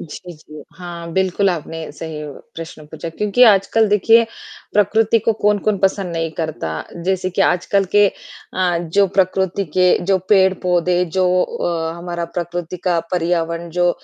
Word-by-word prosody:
जी, 175 +3 -9
जी, 150 -2 -13
हाँ, 170 -1 -8
बिल्कुल 190 +1 +1
आपने 165 -1 -5
सही 155 -1 -7 0.3
प्रश्न 160 -2 -9
पूछा, 160 +2 -7
क्योंकि 210 +8 +1
आजकल 220 +1 +4
देखिए, 225 +3 +5 0.5
प्रकृति 215 +2 +3
को 225 - +1
कौन-कौन 210 0 +2
पसंद 190 -2 0
नहीं 165 0 -1
करता। 155 - -3 0.3
जैसे 185 0 0
कि 180 - -2
आजकल 195 +3 +2
के 205 0 +7 0.5
अ, 180 -2 +1
जो 175 +4 +2
प्रकृति 190 0 +1
के 180 -1 +4
जो 190 +1 +2
पेड़-पौधे, 180 -2 +3
जो 180 +1 +1
अ, 165 -1 -2
हमारा 170 0 -4
प्रकृति 175 +1 -5
का 175 -2 +2
पर्यावरण 170 -1 -1
जो 175 +1 +2
180 Hz, 145 wpm, -19 LUFS, 170-195 Hz, 0.5 s, के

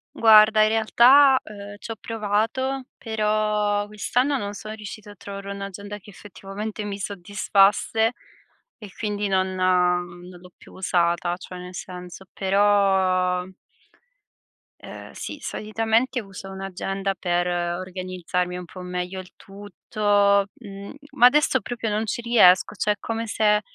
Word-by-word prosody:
Guarda 215 -1 +6
in 215 - +3
realtà, 255 +5 +6
uhm, 205 -1 -10
ci 225 - -8
ho - - -4
provato, 225 +5 -2
però 210 -2 0
quest'anno 250 +7 0
non 205 -3 -4
sono 215 +1 -8
riuscita 210 -1 -9
a 205 - -14
trovare 200 +1 -8
un'agenda 200 +1 -7
che 205 +2 -16
effettivamente 205 +2 -7
mi 205 -1 -5
soddisfasse 205 +3 +1 0.7
e 210 - -9
quindi 205 -1 -2
non 190 -1 0
non 180 -1 +1 0.2
l'ho 180 0 -16
più - - -17
usata. 175 -1 0
Cioè, 180 0 -10
nel 180 0 -9
senso 180 +1 -9
però 190 -2 +2 1.4
ehm, - - -10
sì, - - -7
solitamente 225 +4 -1
uso 195 -1 -10
un'agenda 195 +1 -3
per 175 -1 -1
organizzarmi 180 0 -3
un 180 - -6
po' 185 - -12
meglio 180 +1 -4
il 185 -1 -11
tutto, 200 0 0
mhmm, 200 -2 -10 0.2
ma 240 - +5
adesso 260 0 +4
proprio 230 0 -4
non 210 +1 -1
ci 230 +2 -3
riesco, 215 -6 +5
cioè 210 0 +1
è - - -15
come 225 0 -4
se 210 -1 +2
205 Hz, 135 wpm, -23 LUFS, 185-215 Hz, 1.4 s, Guarda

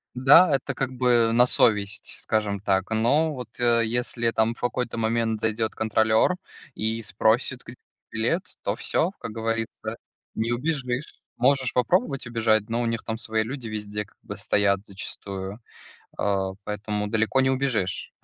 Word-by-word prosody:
Да, 140 +5 +7
это 135 +1 -3
как 130 0 -2
бы 120 -2 +3
на 120 +1 +6
совесть, 105 -4 +1
скажем 105 -2 -1
так, 95 -1 0
но 140 +9 +2
вот, 125 -5 -7
э, 120 -1 +4
если 120 0 0
там 115 +1 +1
в - - -20
какой-то 125 -1 -2
момент 115 0 0
зайдет 110 0 -1
контролер 110 +8 +2 0.4
и 110 +1 -2
спросит, 115 +5 +1
где 120 - -10 0.4
билет, 120 - 0 0.2
то - - 0
всё, 175 - 0
как - - -5
говорится, 115 0 -3 0.4
не 115 +2 -1
убежишь, 130 0 -3 0.2
можешь 130 0 +2
попробовать 135 - +1
убежать, 110 -3 +1
но 115 +1 0
у - - 0
них 115 -1 -2
там 110 - -3
свои 110 -1 -1
люди 125 +1 -6
везде 105 -1 -4
как 100 - -27
бы - - -7
стоят 100 -1 +1
зачастую, 100 0 -7 0.6
э, - - 0 0.4
поэтому 105 0 -3
далеко 110 +4 +2
не 130 - +3
убежишь 120 -9 -1
115 Hz, 155 wpm, -25 LUFS, 110-125 Hz, 0.6 s, Да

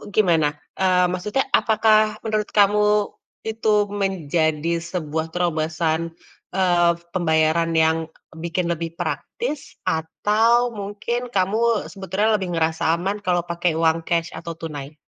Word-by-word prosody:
gimana? 160 -8 +3 0.2
Eee, 180 -1 +4
maksudnya 210 +9 -1
apakah 215 -1 +3
menurut 215 -1 -1
kamu 210 0 +3 0.3
itu 220 -1 0 0.3
menjadi 165 -2 0
sebuah 160 -2 -3
terobosan, 165 -1 -1 0.5
eee, 175 -2 +4 0.2
pembayaran 160 -1 +2
yang 160 0 +4 0.4
bikin 170 +2 -3
lebih 165 0 -6
praktis 380 - -4
atau 220 +9 +2
mungkin 215 +4 -4
kamu 220 +3 +1
sebetulnya 195 +3 0
lebih 185 - -3
ngerasa 160 0 0
aman 195 +4 -3
kalau 175 -3 0
pakai 170 -1 -1
uang 165 0 +2
cash 165 0 -1
atau 165 0 -7
tunai? 150 -2 -7
175 Hz, 115 wpm, -22 LUFS, 160-210 Hz, 0.5 s, Eee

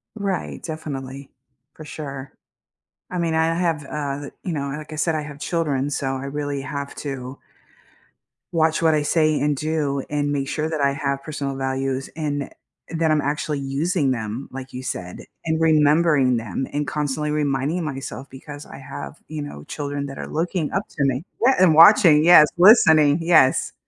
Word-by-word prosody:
Right, 200 -4 -3
definitely, 140 -4 -6 0.4
for 155 - -11
sure. 140 -3 -7 0.8
I 180 - -3
mean, 170 -2 0
I 160 +1 +2
have, 165 -4 0
uh, 140 0 -4
the 140 - -8
you 175 - -3
know, 140 -2 -3
like 150 +2 -7
I - - -5
said, 160 +1 0
I 155 - -1
have 145 -1 -9
children, 145 -5 -1
so 135 -2 -2
I 135 +1 -5
really 145 0 -3
have 140 +1 -6
to 135 -2 -6 1.1
watch 160 -1 +2
what 160 -1 +4
I 150 - +1
say 155 0 +2
and 145 -1 +1
do, 150 -2 -1
and 145 -1 -1
make 140 -1 -1
sure 155 +2 -2
that 160 -1 -3
I 140 -1 +2
have 140 -1 -2
personal 140 -2 -4
values, 135 0 -2
and 145 -3 -2
it - - -12 0.4
that 160 -1 +1
I'm 155 - +3
actually 145 0 -2
using 140 +2 0
them, 115 +1 -4
like 130 0 -8
you 125 - -6
said, 90 -8 -5 0.3
and 160 0 0
remembering 150 -4 +3
them, 115 +3 -3
and 145 -1 -2
constantly 150 +1 -2
reminding 150 +3 -1
myself, 135 -2 -6
because 145 +2 -10
I - - -11
have, 140 +3 -8
you 155 -1 -5
know, 75 - -8
children 145 -1 -4
that 135 -1 -8
are - - -6
looking 165 0 -2
up 195 - -1
to 145 - -3
me. 135 +3 0 0.2
Yeah, 265 - +5
and 180 -4 +6
watching, 165 -3 +7
yes, 165 -3 +8
listening, 160 -7 +6
yes. 165 -6 +3
145 Hz, 180 wpm, -22 LUFS, 135-160 Hz, 1.1 s, yes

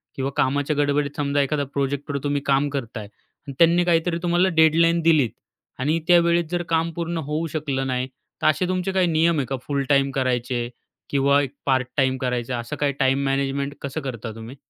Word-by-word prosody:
किंवा 135 0 -2
कामाच्या 145 +3 +1
गडबडीत 145 0 0
समजा, 145 -1 +1
एखादा 145 +1 0
प्रोजेक्टवर, 140 +1 -2
तुम्ही 145 0 0
काम 140 +1 +2
करताय 120 -6 -5 0.4
आणि 140 - -6
त्यांनी, 170 +1 +5
काहीतरी 170 0 +2
तुम्हाला 175 +2 +3
डेडलाईन 165 +2 +4
दिलीत 155 -7 +3 0.5
आणि 155 +5 +1
त्यावेळेस 170 -1 +4
जर, 175 0 -1
काम 165 0 +1
पूर्ण 170 0 -3
होऊ 160 +2 -1
शकलं 140 -4 -2
नाही 130 0 -1 0.3
तर - - +2
असे 155 +4 +2
तुमचे 185 +1 -1
काही 190 -1 +2
नियम 165 0 +2
आहे 135 - 0
का, 135 - -3
फुल 140 -1 0
टाईम 140 -1 +3
करायचे 125 -2 -1 0.4
किंवा 140 0 +3
एक 135 -3 -3
पार्ट 130 -2 +1
टाईम 130 -1 +2
करायचं, 125 -1 -2
असं 120 - -5
काही 145 -1 0
टाईम 135 +1 +2
मॅनेजमेंट 140 +1 -1
कसं 140 +3 -4
करता 120 -4 -5
तुम्ही? 115 +3 -9
140 Hz, 185 wpm, -23 LUFS, 135-165 Hz, 0.5 s, त्यांनी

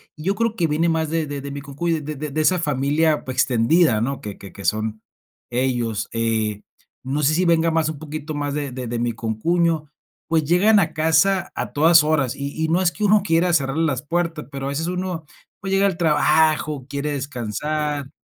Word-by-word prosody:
Y 155 - -10
yo 195 +4 0
creo 230 0 0
que 170 -6 +1
viene 160 +3 +1
más 160 -1 0
de 165 0 0
de 145 -1 -5
de 140 +1 -6
mi 140 0 -6
concuño, 145 +5 -2
de 150 +1 -5
de 150 +2 -5
de 155 +3 0
esa 180 +3 +3
familia, 150 +1 +1
pues 130 -1 -5
extendida, 125 0 +3
¿no? 135 +4 -2
Que 105 -2 -7
que 100 - -11
que 100 - -10
son 110 0 -1 0.5
ellos. 120 -3 -1
Eh, 110 -2 -1 0.4
no 140 +3 -2
sé 145 +2 +3
si 180 +3 +2
venga 165 -1 +3
más 160 -1 +1
un 155 -3 -6
poquito 155 0 -6
más 145 -1 -2
de 145 -2 -3
de 125 -1 -5
de 120 0 -3
mi 120 -1 -1
concuño, 150 +8 0 0.4
pues 160 -1 +2
llegan 195 +7 +4
a 160 -4 0
casa 160 +4 +2
a - - -4
todas 160 +2 +6
horas 150 -5 +1
y 140 0 -5
y - - +2
no 175 +3 +2
es 175 -2 +2
que 210 - -6
uno 210 0 +5
quiera 175 -1 +2
cerrarle 140 0 +1
las 135 -4 -1
puertas, 170 0 -2
pero 135 -1 -5
a - - -2
veces 155 +4 -2
uno, 180 -2 -3 0.3
pues 195 - -5
llega 195 +1 +3
al 190 -4 -2
trabajo, 155 -3 +2
quiere 140 +1 -3
descansar, 145 +3 -3
150 Hz, 215 wpm, -22 LUFS, 135-165 Hz, 0.5 s, todas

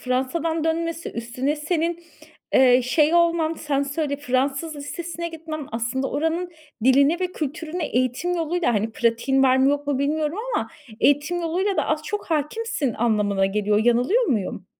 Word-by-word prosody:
Fransa'dan 300 +6 -1
dönmesi, 330 0 -1
üstüne 250 +6 -2
senin, 335 +2 -2 0.5
eee, 255 -1 +6
şey 300 +6 +2
olman 335 -2 +3
sen 285 -3 -1
söyle, 285 0 -2
Fransız 275 +3 -1
lisesine 340 +4 -5
gitmen, 315 -3 -7
aslında 245 +4 -2
oranın 325 +4 -1 0.3
diline 280 +6 +4
ve 365 - +1
kültürüne 320 +2 -4
eğitim 255 +8 0
yoluyla, 330 -5 0
hani, 215 +2 0
pratiğin 240 +4 +1
var 260 -1 +5
mı 265 +1 +4
yok 290 0 -2
mu 280 -2 0
bilmiyorum 300 +4 -1 0.2
ama - - -1 0.3
eğitim 290 +5 +2
yoluyla 370 +4 -1
da - - +1
az 310 0 0
çok 410 +7 -4
hâkimsin 310 - -1
anlamına 210 -4 +1
geliyor. 210 +1 +1
Yanılıyor 245 - +3
muyum? 205 - -2
290 Hz, 150 wpm, -23 LUFS, 255-330 Hz, 0.5 s, eee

